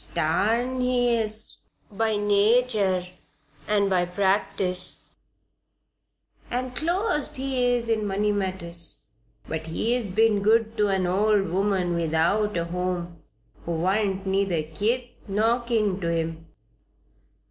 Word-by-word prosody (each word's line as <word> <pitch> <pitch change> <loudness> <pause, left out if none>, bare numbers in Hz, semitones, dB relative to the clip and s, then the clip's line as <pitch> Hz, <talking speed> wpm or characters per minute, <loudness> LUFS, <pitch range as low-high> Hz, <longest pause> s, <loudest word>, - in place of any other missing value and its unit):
Starn 230 +10 0
he 245 -1 +2
is 220 -1 -2 0.3
by 220 +1 0
natur 205 -2 +2 0.6
and 205 -1 +2
by 185 -2 +2
practice; 180 0 -1 1.5
an' 250 +1 -2
clost 315 - 0
he 260 -2 0
is 235 -1 -1
in 220 -2 0
money 205 +2 0
matters. 185 -4 -2 0.5
But 160 0 -4
he's 225 +6 0
been 215 +1 +3
good 220 +2 +2
to 210 -1 +3
an 190 -2 +1
old 200 +1 +2
woman 190 -1 0
without 170 +5 +1
a 170 - -1
home 175 -1 -3 0.4
who 170 - -3
warn't 190 +3 0
neither 190 -4 0
kith 225 +10 -2
nor 225 +4 +2
kin 215 -5 0
to 170 - -1
him." 165 0 -3
200 Hz, 115 wpm, -25 LUFS, 180-225 Hz, 1.5 s, been